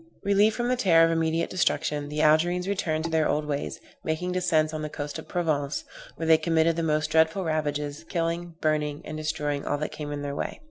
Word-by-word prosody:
Relieved 205 +2 +3
from 240 0 -1
the 250 - +2
terror 170 -8 +5
of 165 - +1
immediate 165 0 0
destruction, 150 -5 0
the 150 +1 -1
Algerines 175 +4 +3
returned 160 -6 -1
to 165 - -2
their 160 -1 +2
old 150 +1 0
ways, 145 -1 -3 0.2
making 160 +3 -2
descents 165 -4 +1
on 155 - -3
the 155 - -3
coast 145 0 -5
of - - -10
Provence, 150 -5 -1 0.3
where 165 - -4
they 160 -1 +6
committed 165 -1 +2
the 165 - -1
most 155 -1 0
dreadful 160 +4 +3
ravages, 150 -2 -2
killing, 170 -1 -2
burning 150 -1 0
and 155 - -6
destroying 150 -2 -2
all 145 - -1
that 150 - -3
came 150 -1 -6
in 145 0 -4
their 140 0 -3
way. - - -4
160 Hz, 215 wpm, -26 LUFS, 150-170 Hz, 0.3 s, they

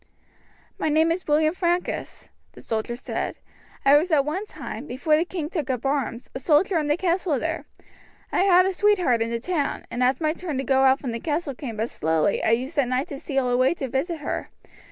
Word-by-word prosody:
"My - - 0
name 315 +2 +3
is 360 +2 -3
William 310 +1 +3
Francus," 350 0 -2 0.2
the - - -13
soldier 225 +1 -3
said. 245 - -4 0.5
"I 280 +1 +7
was 330 +5 +1
at 295 -4 +3
one 370 +8 -3
time, 285 - -7
before 290 +5 +1
the 315 - +2
king 340 -4 -4
took 310 -5 -3
up 255 -1 -2
arms, 270 -3 -1
a - - -4
soldier 320 +6 +3
in 300 - -2
the 295 +2 +2
castle 350 -4 +1
there. 320 +4 -3 0.6
I - - +1
had 370 -1 +5
a 380 - 0
sweetheart 365 - +3
in 230 - 0
the 235 0 -2
town, 310 +2 -2
and 245 - -3
as 255 +1 +2
my 310 -1 +1
turn 335 -5 -5
to 265 - -1
go 265 +1 +2
out 265 0 +5
from 255 - -3
the 230 - -4
castle 300 +1 -2
came 240 -4 -7
but 225 +3 -2
slowly 160 +5 +1
I - - +2
used 260 +7 0
at 265 - +2
night 255 +5 -1
to 280 - -6
steal 270 -3 -1
away 255 +5 +3
to 270 - -4
visit 310 +5 -2
her. 290 - -3
290 Hz, 220 wpm, -24 LUFS, 255-335 Hz, 0.6 s, I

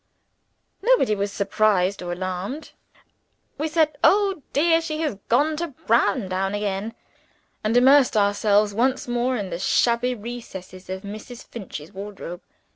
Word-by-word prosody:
Nobody 470 - +3
was 200 0 -2
surprised 200 -2 +1
or 175 -1 -4
alarmed. 185 - -5 0.9
We 310 - 0
said, 310 -2 +1
"Oh, 395 -4 +4
dear, 330 +3 +3
she 315 -1 -3
has 295 -11 -2
gone 295 +6 +3
to 340 +2 -2 0.2
Browndown 200 -4 +1
again!" 205 +1 -3 0.7
and 220 +3 +2
immersed 265 -1 +5
ourselves 205 0 +3
once 255 +5 +1
more 245 +1 0
in 195 -4 -4
the 170 - -4
shabby 240 +5 +2
recesses 195 -5 -9
of 190 +1 -5
Mrs. 215 +4 -9
Finch's 180 -8 -8
wardrobe. 195 -2 -7
215 Hz, 130 wpm, -23 LUFS, 195-265 Hz, 0.9 s, immersed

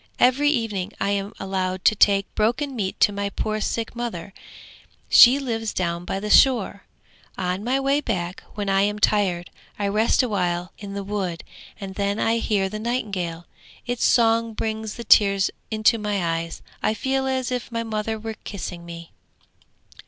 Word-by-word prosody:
Every 275 +4 +4
evening 215 -7 -2
I 200 - 0
am 200 0 -2
allowed 185 -1 -3
to - - +6
take 200 -1 +3
broken 250 +6 0
meat 195 -5 -3
to - - +5
my 200 0 -2
poor 215 +1 -3
sick 230 +2 -2
mother: 200 -7 -5 0.8
she 250 +3 +8
lives 225 -5 -3
down 170 -1 -2
by 195 - -3
the 210 - -5
shore. 230 -6 +4 0.5
On 185 +1 -2
my 255 +4 +1
way 275 +2 +1
back, 185 -7 -3
when 205 -1 -3
I 195 0 +3
am 205 +1 0
tired, 195 -5 +1 0.3
I 205 - -1
rest 215 +6 +2
awhile 180 -6 -1
in 200 -1 -7
the 200 - -3
wood, 190 -4 -3 0.4
and 195 -1 -6
then 200 +1 -1
I 225 +1 +1
hear 205 -4 0
the 215 +2 -6
nightingale. 195 -8 -3 0.4
Its 245 -1 -2
song 230 -1 +3
brings 220 -1 -3
the 235 - -7
tears 200 -3 +4 0.2
into 220 +1 +2
my 195 -6 -1
eyes; 165 0 -7 0.2
I 215 - +1
feel 265 +1 -1
as 260 -1 -1
if 250 -1 -3
my 230 0 -2
mother 220 0 -3
were 220 +1 -5
kissing 180 -3 -6
me!' 170 -1 -10
210 Hz, 170 wpm, -23 LUFS, 190-230 Hz, 0.8 s, she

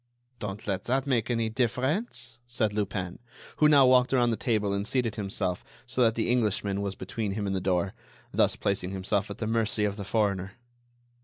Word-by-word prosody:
"Don't 105 -1 -5
let 100 -3 -2
that 130 +3 +1
make 125 -5 +1
any 115 -2 +1
difference," 125 - -1
said 110 -3 0
Lupin, 95 -3 -2 0.4
who 150 - +5
now 140 -3 +7
walked 125 0 +5
around 120 -2 +3
the - - +1
table 105 -4 0
and 100 +1 -2
seated 125 -5 0
himself 95 -3 -2 0.2
so 130 +1 -2
that 115 -2 +4
the 110 - 0
Englishman 105 -4 +1
was 100 -1 -3
between 100 +2 -3
him 105 0 -2
and 95 -1 -1
the 95 - -1
door—thus 95 +1 -1
placing 95 -2 -1
himself 95 +1 -1
at - - -6
the 110 - -3
mercy 110 -1 +1
of 100 0 -2
the 100 - -4
foreigner. 100 -2 0
110 Hz, 185 wpm, -28 LUFS, 100-120 Hz, 0.4 s, now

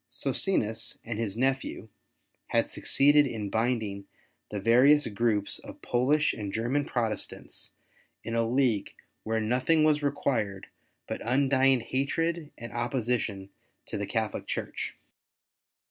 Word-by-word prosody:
Socinus 110 - -1
and 115 -2 -4
his 110 -2 -2
nephew 135 -3 -1 0.6
had - - +1
succeeded 145 +1 +4
in 105 -5 -4
binding 110 -4 -1 0.4
the 105 - -3
various 130 +8 +5
groups 105 -1 0
of - - -11
Polish 140 +5 +2
and 105 -3 -5
German 125 +7 0
Protestants 115 -4 -3 0.5
in 115 - -4
a 115 0 +2
league 115 -4 +1 0.3
where 110 0 -1
nothing 130 +8 +2
was 155 -1 +3
required 115 -9 -1 0.4
but - - -4
undying 135 0 +3
hatred 155 +6 -1
and 115 0 -8
opposition 120 -5 -2 0.3
to - - -6
the - - -3
Catholic - - -2
Church. - - -4
120 Hz, 120 wpm, -28 LUFS, 110-140 Hz, 0.6 s, various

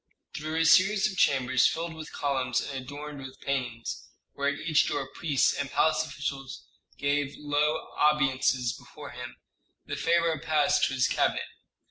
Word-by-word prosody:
Through 155 +1 -4
a 165 0 +2
series 195 +5 +5
of - - -9
chambers 130 -6 +3
filled 165 0 -3
with 160 -1 -9
columns 130 -3 0
and 140 - -5
adorned 145 +1 -7
with 130 0 -10
paintings, 125 -4 -3 0.3
where 140 0 0
at 145 - -2
each 155 -1 +2
door 145 -2 -1
priests 150 -6 +2
and 140 - -3
palace 155 +1 +2
officials 140 -3 -5 0.3
gave 145 0 0
low 150 +1 0
obeisances 130 -4 +2
before - - -11
him, - - -8 0.5
the - - -4
pharaoh 170 -2 +2
passed 155 -2 +2
to 135 - -3
his 130 - +3
cabinet. - - +1
145 Hz, 155 wpm, -28 LUFS, 135-155 Hz, 0.5 s, series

